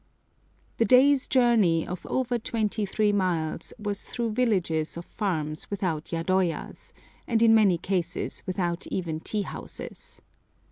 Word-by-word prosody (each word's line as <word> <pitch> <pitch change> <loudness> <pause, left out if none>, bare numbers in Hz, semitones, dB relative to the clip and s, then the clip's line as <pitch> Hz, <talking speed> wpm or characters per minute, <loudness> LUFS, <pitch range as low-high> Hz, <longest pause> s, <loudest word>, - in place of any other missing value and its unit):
The 230 - +3
day's 265 +4 +5
journey, 225 -10 +3
of 180 0 -6
over 245 -2 0
twenty 215 -2 -1
three 210 +2 +1
miles, 180 -6 -1
was 205 -1 -3
through 235 -2 -3
villages 185 -10 0
of 170 - -7
farms 155 -7 -2
without 180 -6 -2
yadoyas, 175 +1 -1 0.4
and 230 -1 +2
in 225 -1 +6
many 205 -5 +5
cases 180 0 -2
without 175 -2 -2
even 165 -4 -3
tea 210 +5 -2
houses. - - -8
195 Hz, 130 wpm, -27 LUFS, 170-225 Hz, 0.4 s, in